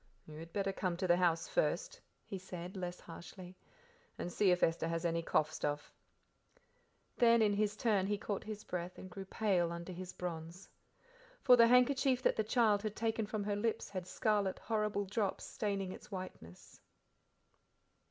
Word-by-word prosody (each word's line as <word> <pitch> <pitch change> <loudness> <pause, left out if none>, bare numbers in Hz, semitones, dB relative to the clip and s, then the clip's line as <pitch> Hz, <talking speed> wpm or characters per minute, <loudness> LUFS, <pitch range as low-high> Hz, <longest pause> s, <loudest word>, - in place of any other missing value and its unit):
"You 155 0 -10
had 165 +1 -9
better 195 0 -1
come 185 -3 -1
to 185 - -1
the 175 -1 +4
house 165 -2 +2
first," - - -1 0.2
he 195 - -5
said, 180 0 -7
less 180 -1 -4
harshly, 180 +2 -10 0.6
"and 175 - -4
see 205 - +3
if 180 0 +3
Esther 165 0 +2
has 165 +1 -2
any 170 0 +1
cough 155 -1 +1
stuff." 145 -1 -3 1.2
Then 235 -1 +6
in 205 -1 +3
his 210 +1 +1
turn 205 -5 +2
he 205 0 0
caught 200 -1 -3
his 215 -1 -6
breath 180 0 -5
and 185 - -9
grew 195 +2 -7
pale 190 -4 +1
under 170 +2 -6
his 185 +1 -6
bronze. 170 +1 -6 0.7
For 250 - +8
the 230 -1 +7
handkerchief 250 +1 +4
that - - +3
the 220 - +1
child 215 -2 +3
had 215 -1 -3
taken 225 -1 -1
from 215 -1 -2
her 205 0 -1
lips 220 +2 -1
had 185 -2 -5
scarlet, 205 -2 +1
horrible 210 -2 -1
spots 205 0 -1
staining 200 -3 -2
its - - -10
whiteness. 185 - -9
195 Hz, 170 wpm, -35 LUFS, 175-215 Hz, 1.2 s, For